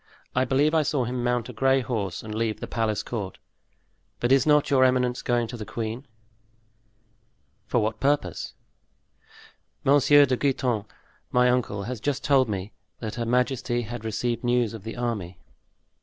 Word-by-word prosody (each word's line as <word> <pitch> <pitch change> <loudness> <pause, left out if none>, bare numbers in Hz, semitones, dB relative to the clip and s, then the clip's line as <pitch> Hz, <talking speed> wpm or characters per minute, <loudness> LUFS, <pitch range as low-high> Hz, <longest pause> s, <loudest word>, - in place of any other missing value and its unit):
I 130 0 +2
believe 140 +4 +2
I 160 - +4
saw 140 -3 0
him 125 0 -3
mount 120 -1 0
a - - -7
gray 135 +3 +3
horse 105 -7 -3
and 110 -1 -6
leave 110 0 -1
the - - -4
palace 110 -2 -1
court. 105 -6 -5 0.8
But 120 - 0
is 135 +1 +4
not 150 -1 +4
your 130 -2 +5
eminence 125 -1 +2
going 120 -1 +1
to 120 - -6
the 110 - -6
queen?" 115 +4 -5 1.6
"For 120 - +2
what 110 0 -2
purpose?" 140 - -1 1.3
"Monsieur 145 +1 +6
de 130 -1 +1
Guitant, 125 -6 0 0.4
my 125 0 +4
uncle, 120 -5 -1
has 120 +2 -5
just 145 +4 -2
told 135 -4 +3
me 100 0 -4 0.3
that 110 -2 -5
her 120 -1 -3
majesty 125 0 0
had 120 +1 -7
received 115 +2 -2
news 120 -2 +1
of 110 -4 -8
the 115 - -6
army." 105 -8 -3
120 Hz, 165 wpm, -25 LUFS, 110-130 Hz, 1.6 s, Monsieur